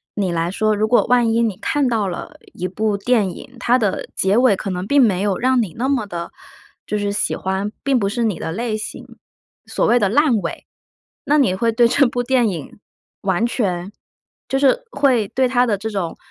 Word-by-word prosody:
你 195 -4 -1
来 170 0 -1
说， 215 +2 +1
如 215 +1 +1
果 240 - +3
万 240 -2 +3
一 230 - +2
你 220 -5 0
看 280 +5 0
到 220 -4 0
了 175 - -6 0.2
一 180 - -4
部 210 +2 -1
电 210 -1 +1
影， 250 - -12
它 245 0 +3
的 210 -6 -1
结 195 +4 +2
尾 250 -5 +4
可 195 - -5
能 180 0 -3
并 285 +2 +4
没 195 -7 +3
有 200 -2 0
让 255 0 +2
你 185 -7 -4
那 255 +3 -1
么 265 -6 0
地 170 -3 -6 0.5
就 210 - -2
是 205 -1 -1
喜 205 - -1
欢， 190 +2 -2
并 270 -3 +2
不 195 - 0
是 235 +3 -2
你 210 -6 -1
的 - - -4
类 220 +4 -2
型 215 - -8 0.5
所 - - -1
谓 245 - +4
的 200 - +2
烂 270 0 +3
尾。 - - -6 0.6
那 295 +1 +3
你 235 -10 +3
会 230 +4 +1
对 235 +1 +4
这 275 +4 +3
部 245 +1 -2
电 245 -2 +2
影 170 +1 -7 0.4
完 195 +2 +1
全 190 -6 -2 0.6
就 270 - +1
是 285 - +3
会 255 -7 +2
对 260 0 +1
它 250 0 +2
的 215 -4 0
这 220 +3 -4
种， 195 -6 -4
220 Hz, 230 characters per minute, -20 LUFS, 195-245 Hz, 0.6 s, 尾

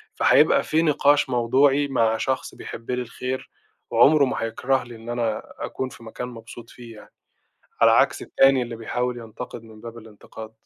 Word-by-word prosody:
فهيبقى - - +4
في 160 - +1
نقاش 145 -3 +3
موضوعي 135 +4 +2
مع 115 -4 +1
شخص 130 +2 -3
بيحب 115 +2 -8
لي 125 0 -1
الخير، 125 +2 -5 0.4
وعمرُه 140 +5 +5
ما 130 - -3
هيكره 130 +4 -1
لي 120 -1 -11
إن 115 +1 -11
أنا 115 -2 -2 0.2
أكون 130 - -4
في 115 - -14
مكان 115 +2 -7
مبسوط 115 -1 -11
فيه 120 -2 -12
يعني، - - -16 0.7
على - - +7
عكس - - +2
التاني 135 -1 +3
اللي 120 -1 -6
بيحاول 125 +2 -3
ينتقد 115 +1 -9
من 110 -1 -15
باب 115 0 -9
الانتقاد. 110 0 -12
120 Hz, 170 wpm, -23 LUFS, 115-130 Hz, 0.7 s, على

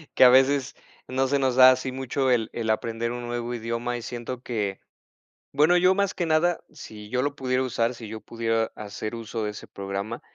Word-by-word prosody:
que - - +6
a 125 - +10
veces 135 +1 +3 0.3
no 130 +1 0
se 140 +1 +1
nos 130 -2 +1
da 130 0 +9
así 130 0 -1
mucho 130 0 -1
el 115 -3 +1
el 115 -2 -3
aprender 115 +1 -1
un 120 0 -5
nuevo 120 0 -3
idioma 115 +1 -3
y - - -7
siento 120 +1 -6
que 105 -6 -3 0.7
bueno, 155 +5 +4
yo 185 +1 +4
más 200 0 +1
que 175 - -2
nada, 165 +2 +2
sí 105 -8 -10
yo 125 +2 0
lo 140 +1 -1
pudiera 130 -1 0
usar, 120 -1 0
sí 120 -2 -9
yo 110 +1 -7
pudiera 115 0 -1
hacer 105 +2 -6
uso 115 0 -5
de 105 - -2
ese 105 - -10
programa, 100 +4 -5
120 Hz, 210 wpm, -25 LUFS, 115-130 Hz, 0.7 s, a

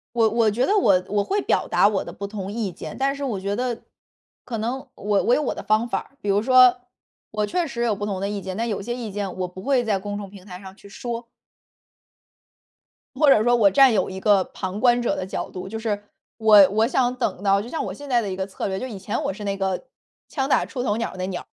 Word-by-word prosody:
我 225 -2 +4
我 230 0 +2
觉 225 +5 +1
得 415 +8 +3
我， 190 - +4
我 205 0 +1
会 405 - 0
表 - - +1
达 - - +4
我 205 -2 -1
的 - - -8
不 200 - -8
同 200 -1 -5
意 215 -2 -2
见， - - -8
但 275 +1 0
是 280 - -4
我 225 -8 -2
觉 200 +1 -2
得 245 -1 -2 0.6
可 230 -2 -4
能 240 +5 -3
我 205 -1 0
我 245 - +4
有 - - +1
我 285 - -1
的 - - -6
方 215 +3 +1
法 - - 0
儿， 275 - -12
比 205 - -5
如 200 +1 +3
说 250 +1 +5 0.5
我 215 -1 0
确 345 +10 -1
实 235 -5 -4
有 225 -3 +1
不 205 - -4
同 195 -3 -3
的 200 - -1
意 205 0 -3
见， 190 -1 -6
但 230 +2 -1
有 210 - -2
些 240 +4 -4
意 240 -3 -5
见 200 -2 -4
我 185 -1 -2
不 180 +1 -10
会 260 +4 +2
在 215 -4 0
公 205 +1 -5
众 200 -2 -7
平 195 -1 -14
台 180 -2 -9
上 190 -1 -11
去 200 - -15
说。 235 +3 -5 1.9
或 295 +2 +3
者 220 -6 +6
说 240 0 +4
我 205 -4 +5
占 265 +5 +6
有 195 -4 +1
一 190 - -6
个 200 -1 +4
旁 190 +3 -6
观 245 0 +4
者 240 - 0
的 - - -3
角 - - -4
度， 185 0 -7
就 220 +3 -5
是 215 -2 -2 0.3
我， 210 -3 +7
我 220 +3 +2
想 250 0 +1
等 205 -7 -2
到， 200 0 +3
就 230 - -9
像 320 - -3
我 190 - -5
现 285 +7 -10
在 245 -3 +3
的 210 - -4
一 - - -3
个 190 0 -2
策 195 - -5
略， 190 -1 -2
就 255 - -4
以 220 -6 -7
前 195 +2 -3
我 - - -1
是 205 +2 -8
那 200 -1 -1
个 190 -1 -2 0.4
“枪 270 -2 -2
打 - - +2
出 250 - -5
头 210 -4 0
鸟 230 - -2
儿” - - -14
的 - - -12
那 185 - -2
鸟 185 -2 -4
儿。 - - -29
210 Hz, 295 characters per minute, -23 LUFS, 195-240 Hz, 1.9 s, 我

